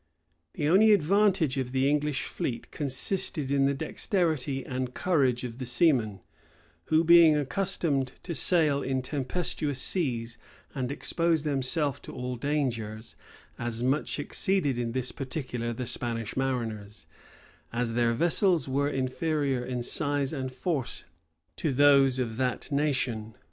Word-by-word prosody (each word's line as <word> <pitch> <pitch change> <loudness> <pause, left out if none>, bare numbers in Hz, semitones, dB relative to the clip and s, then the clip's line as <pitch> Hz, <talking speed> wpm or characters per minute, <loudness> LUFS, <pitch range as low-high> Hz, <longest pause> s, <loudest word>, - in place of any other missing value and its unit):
157 145 - -1
The 160 - +3
only 215 +3 +7
advantage 190 -4 +2
of 125 -1 -3
the 130 +1 +2
English 150 -1 0
fleet 120 -3 -4
consisted 145 +1 -1
in 140 -1 +3
the 140 - +1
dexterity 155 -3 -1
and 130 -1 -4
courage 135 -9 +1
of 120 0 -6
the 130 - -4
seamen, 120 - +2 0.6
who, 160 +1 +3
being 170 -2 +7
accustomed 145 -3 0
to 175 - -4
sail 150 0 +2
in 130 -1 -1
tempestuous 145 +1 -2
seas 120 -9 -2 0.3
and 130 -2 -3
expose 165 +1 0
themselves 140 0 -1
to - - -10
all 125 0 -4
dangers, 115 -5 -2 0.4
as 120 0 -3
much 135 +4 0
exceeded 145 -3 0
in 115 -1 -2
this 125 -1 -1
particular 130 -4 -4
the 125 +2 -4
Spanish 115 -2 -3
mariners, 115 -6 -3 0.7
as 120 0 -1
their 120 0 +2
vessels 170 - +2
were 140 +2 +1
inferior 135 0 -1
in 125 -1 -3
size 145 +2 -1
and 130 -3 -3
force 130 0 -3 0.5
to 155 - 0
those 135 -1 +5
of 115 -3 -2
that 130 +2 -2
nation. 130 -7 -1
135 Hz, 140 wpm, -28 LUFS, 125-155 Hz, 0.7 s, only